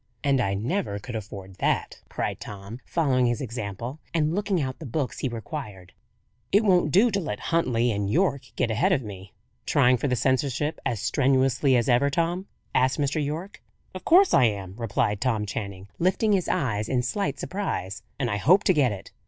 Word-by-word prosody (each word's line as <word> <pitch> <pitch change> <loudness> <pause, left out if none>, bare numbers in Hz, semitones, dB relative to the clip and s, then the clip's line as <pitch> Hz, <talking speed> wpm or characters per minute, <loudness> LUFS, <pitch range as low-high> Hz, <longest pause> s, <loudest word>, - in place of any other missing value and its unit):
"And 140 -3 +3
I 100 -3 0
never 115 - -2
could 115 +4 -7
afford 95 -3 -8
that," - - -1
cried - - -3
Tom, 100 +3 -8
following 130 -7 +2
his 120 -1 0
example, 120 +2 -5 0.2
and 155 -1 +2
looking 200 -1 0
out 130 -3 -3
the 160 - -8
books 135 +2 -3
he 130 - -1
required. 110 - -7 0.6
"It 205 +3 +4
won't 180 -6 +3
do 220 - +5
to 200 - 0
let 105 - -4
Huntley 125 -8 +2
and 100 -2 -1
Yorke 140 - +1
get 120 -2 0
ahead 110 - +2
of 130 - 0
me." 95 -3 -10 0.3
"Trying 125 +1 +4
for 145 - -1
the 125 - +1
seniorship 135 +4 0
as 115 -4 -2
strenuously 130 +1 +2
as 120 - 0
ever, 125 +3 +3
Tom?" 170 +6 -1 0.3
asked 130 +1 +2
Mr. 145 +1 0
Yorke. 165 +7 -5 0.3
"Of 185 - -8
course 375 +3 +5
I - - +6
am," 100 -4 -2
replied 105 -2 -1
Tom 115 -5 0
Channing, 100 -2 -6
lifting 190 +5 +2
his 190 -4 +1
eyes 115 - -1
in 125 -2 +1
slight 145 +2 -1
surprise. 110 - -3 0.2
"And 130 - -1
I 105 -3 -1
hope 180 - +4
to 185 - +4
get 140 -7 +3
it." 100 -2 -8
130 Hz, 190 wpm, -26 LUFS, 105-160 Hz, 0.6 s, I